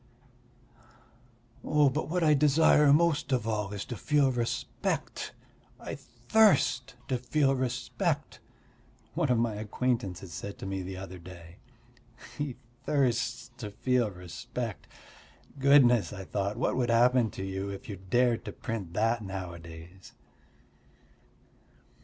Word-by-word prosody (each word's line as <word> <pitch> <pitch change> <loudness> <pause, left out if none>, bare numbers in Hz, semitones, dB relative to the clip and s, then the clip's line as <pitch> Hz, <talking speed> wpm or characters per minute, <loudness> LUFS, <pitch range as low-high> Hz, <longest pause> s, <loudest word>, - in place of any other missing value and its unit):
"But 150 0 +2
what 175 +1 0
I 155 -1 +5
desire 150 0 +5
most 155 -1 +3
of 125 -4 +1
all 105 -3 -1
is 105 -1 -5
to 120 - -5
feel 140 +4 +2
respect. 120 -2 -3 0.5
I - - -6
thirst 125 - +2
to 130 -2 -1
feel 135 +2 +2
respect," 125 -1 -2 0.7
one 160 -4 0
of 125 - +3
my 115 -1 +1
acquaintances 105 -4 -2
said 100 +5 -6
to - - -8
me 95 0 -3
the 95 0 -6
other 95 -1 -8
day. 85 -1 -12 0.8
He 145 -4 -3 0.3
thirsts 125 -4 0
to 105 -4 -5
feel 120 +2 +1
respect! 105 +5 -6 0.7
Goodness, 135 -5 +5
I 95 -2 -7
thought, 100 +3 -2
what - - 0
would 125 -2 0
happen 120 0 +4
to 95 - -7
you 95 +1 -3
if 100 +7 -7
you 100 -4 -6
dared 120 +5 +1
to - - -4
print 105 -8 -5
that 115 +3 +1
nowadays? 85 -2 -8
120 Hz, 125 wpm, -29 LUFS, 95-130 Hz, 0.8 s, I